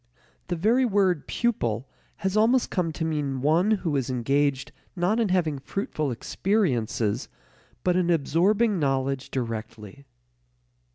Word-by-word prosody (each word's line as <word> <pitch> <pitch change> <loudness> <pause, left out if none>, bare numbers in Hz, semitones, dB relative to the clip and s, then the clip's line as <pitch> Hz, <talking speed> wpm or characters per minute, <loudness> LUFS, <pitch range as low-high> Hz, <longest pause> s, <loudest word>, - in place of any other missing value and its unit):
The 175 - -1
very 225 +10 +3
word 195 - +1
pupil 130 - -1 0.3
has 190 0 -2
almost 230 +4 +3
come 175 -3 0
to 160 +1 -3
mean 145 -4 -2
one 165 +7 +3
who 185 -8 0
is 135 -3 -1
engaged 135 +2 0 0.2
not 185 +6 +1
in 225 -4 +1
having 165 -6 +1
fruitful 155 -1 -3
experiences 125 - -1 0.5
but 180 -1 +2
in 180 -1 +1
absorbing 185 +7 +2
knowledge 135 -1 -1
directly. 115 0 -6
160 Hz, 125 wpm, -26 LUFS, 135-195 Hz, 0.5 s, very